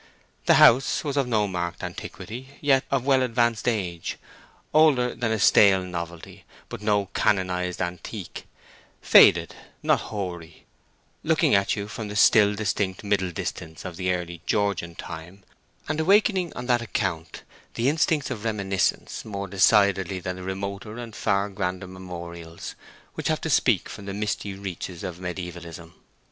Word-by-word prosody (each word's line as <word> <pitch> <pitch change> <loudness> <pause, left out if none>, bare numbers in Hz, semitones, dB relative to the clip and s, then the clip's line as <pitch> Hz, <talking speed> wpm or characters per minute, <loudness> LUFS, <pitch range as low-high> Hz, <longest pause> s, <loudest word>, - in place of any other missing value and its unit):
The - - +7
house 125 +3 +5
was 145 -3 -3
of 140 -3 +1
no 110 -4 +1
marked 85 -2 -4
antiquity, 130 +5 -8
yet 135 -2 +3
of 135 -2 0
well 135 -2 +4
advanced 120 -2 +1
age; 90 -8 -2 0.6
older 145 -6 +4
than 115 -2 -2
a 110 - +1
stale 95 -1 +5
novelty, 85 -2 -7 0.3
but - - -7
no 105 -1 +1
canonized 90 -2 0
antique; 90 -1 -7 0.5
faded, - - +6 0.3
not - - +3
hoary; 85 -6 -6 0.6
looking - - +2
at 100 0 +3
you 100 -1 -4
from 105 +1 -6
the 105 - -7
still 105 -1 +5
distinct 100 -2 -2
middle 100 -3 0
distance 80 -1 -6
of 90 -2 -6
the 90 +1 -1
early 85 -2 -4
Georgian 100 -5 0
time, 85 +5 -9 0.4
and 155 - -2
awakening 190 0 +3
on 125 - -5
that 120 -1 +2
account 95 -8 -3 0.3
the 115 - 0
instincts 150 0 +1
of 105 - -5
reminiscence 100 -4 -1
more 100 -2 -5
decidedly 95 -1 +3
than 90 0 -4
the 95 - -9
remoter 100 +3 -5
and 115 -3 -8
far 100 +1 +1
grander 95 -2 -3
memorials 85 -2 -8 0.4
which - - -4
have - - 0
to - - -2
speak - - +3
from 100 - -9
the 100 - -4
misty 105 -1 -3
reaches 95 -2 -6
of 90 -2 -5
mediaevalism. 85 -2 -7
100 Hz, 150 wpm, -25 LUFS, 90-115 Hz, 0.6 s, The